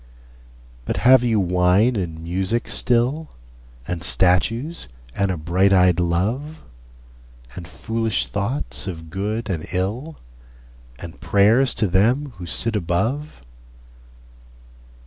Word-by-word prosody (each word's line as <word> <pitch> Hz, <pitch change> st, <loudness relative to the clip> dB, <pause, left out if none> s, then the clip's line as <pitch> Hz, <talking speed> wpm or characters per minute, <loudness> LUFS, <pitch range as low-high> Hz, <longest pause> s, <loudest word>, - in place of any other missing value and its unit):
But -, -, -3 dB
have 130 Hz, 0 st, +7 dB
you 115 Hz, -3 st, +2 dB
wine 90 Hz, +6 st, +2 dB
and 80 Hz, -5 st, -4 dB
music 95 Hz, +7 st, -2 dB
still, 125 Hz, +6 st, +1 dB, 0.6 s
And 90 Hz, -1 st, -4 dB
statues 115 Hz, -, +1 dB, 0.3 s
and 100 Hz, -1 st, 0 dB
a 90 Hz, -, -2 dB
bright 90 Hz, +5 st, +1 dB
eyed 90 Hz, -2 st, +4 dB
love, 110 Hz, -, -2 dB, 0.9 s
And 85 Hz, -3 st, -8 dB
foolish 115 Hz, +2 st, -2 dB
thoughts 110 Hz, +3 st, -3 dB
of 80 Hz, -3 st, -7 dB
good 105 Hz, +5 st, -3 dB
and 85 Hz, -6 st, -4 dB
ill, 115 Hz, -, -3 dB, 0.8 s
And 85 Hz, +4 st, -11 dB
prayers 110 Hz, +6 st, +3 dB
to 110 Hz, -, +1 dB
them 120 Hz, +10 st, +1 dB
who 90 Hz, -1 st, -8 dB
sit 115 Hz, +6 st, 0 dB
above? 105 Hz, -, -2 dB
100 Hz, 110 wpm, -21 LUFS, 90-120 Hz, 0.9 s, have